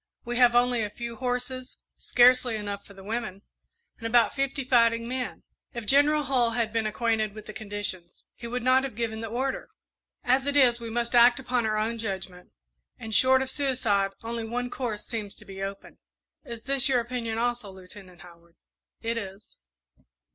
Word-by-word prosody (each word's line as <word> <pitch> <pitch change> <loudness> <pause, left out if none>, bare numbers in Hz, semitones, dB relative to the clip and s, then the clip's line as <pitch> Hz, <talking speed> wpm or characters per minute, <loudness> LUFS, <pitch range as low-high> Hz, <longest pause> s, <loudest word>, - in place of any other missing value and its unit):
We 240 0 -3
have 245 -1 +5
only 245 -1 +3
a 210 - -2
few 235 +2 -7
horses, 250 0 -3 0.2
scarcely 250 -1 +4
enough 205 -1 -5
for 200 - -15
the 195 - -12
women, 215 -2 -4 0.6
and 230 - -3
about 230 -1 +4
fifty 275 0 -1
fighting 230 -2 +3
men. 250 0 -4 0.3
If 235 -2 -5
General 290 +5 +5
Hull 245 -4 +1
had 230 -2 0
been 225 -1 0
acquainted 215 -1 0
with 215 - -9
the 215 - -9
conditions, 205 -5 -4
he 235 - -8
would 245 0 -3
not 255 +1 +4
have 270 -5 -5
given 225 -1 -3
the 225 - -4
order. 260 +4 -3 0.5
As 260 +2 +2
it 285 0 +1
is, 245 -3 +5
we 230 -1 -6
must 235 +1 -2
act 240 +1 +6
upon 245 -3 0
our 215 0 0
own 225 +2 -1
judgment, 190 -4 -5 0.5
and, 220 -1 -7
short 260 +3 +5
of 265 - -5
suicide, 240 -8 +1
only 230 0 -4
one 245 +2 -3
course 230 -5 -4
seems 215 -4 -5
to - - -12
be 195 0 -9
open." 195 0 -7 0.4
"Is 235 -1 -8
this 275 0 +2
your 255 -2 +3
opinion 235 -2 -3
also, 240 -2 -1
Lieutenant 185 -2 -12
Howard?" 170 0 -17 0.5
"It 230 0 -1
is." 195 -1 -10
235 Hz, 185 wpm, -27 LUFS, 215-250 Hz, 0.6 s, act